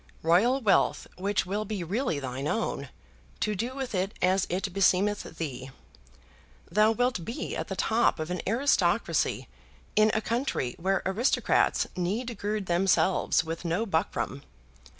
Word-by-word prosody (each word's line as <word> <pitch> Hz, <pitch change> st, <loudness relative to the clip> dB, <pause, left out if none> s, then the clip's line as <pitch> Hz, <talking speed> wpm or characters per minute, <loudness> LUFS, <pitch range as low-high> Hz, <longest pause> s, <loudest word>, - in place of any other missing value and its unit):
Royal 200 Hz, +11 st, +4 dB
wealth 215 Hz, -5 st, +2 dB
which 195 Hz, +1 st, 0 dB
will 205 Hz, +3 st, -2 dB
be 210 Hz, -3 st, -4 dB
really 205 Hz, -, -1 dB
thine 135 Hz, 0 st, -4 dB
own, 150 Hz, -, -2 dB, 0.5 s
to 215 Hz, -, 0 dB
do 235 Hz, +6 st, -3 dB
with 265 Hz, -4 st, -4 dB
it 190 Hz, +2 st, -2 dB
as 185 Hz, +1 st, +2 dB
it 190 Hz, +1 st, -2 dB
beseemeth 195 Hz, -1 st, +1 dB
thee. 135 Hz, -5 st, -5 dB, 1.0 s
Thou 215 Hz, +1 st, +4 dB
wilt 245 Hz, -5 st, 0 dB
be 230 Hz, +8 st, -4 dB
at -, -, -3 dB
the 190 Hz, -, -4 dB
top 225 Hz, 0 st, +2 dB
of 155 Hz, +2 st, -3 dB
an 180 Hz, -, -2 dB
aristocracy 245 Hz, +8 st, +1 dB, 0.5 s
in 215 Hz, 0 st, +5 dB
a -, -, +3 dB
country 230 Hz, -, -1 dB
where 195 Hz, +3 st, 0 dB
aristocrats 210 Hz, +7 st, +2 dB
need 215 Hz, +7 st, -2 dB
gird 210 Hz, 0 st, -2 dB
themselves 180 Hz, -1 st, +2 dB
with 165 Hz, +1 st, -5 dB
no 175 Hz, +6 st, 0 dB
buckram. 160 Hz, -, -1 dB
195 Hz, 145 wpm, -28 LUFS, 170-220 Hz, 1.0 s, in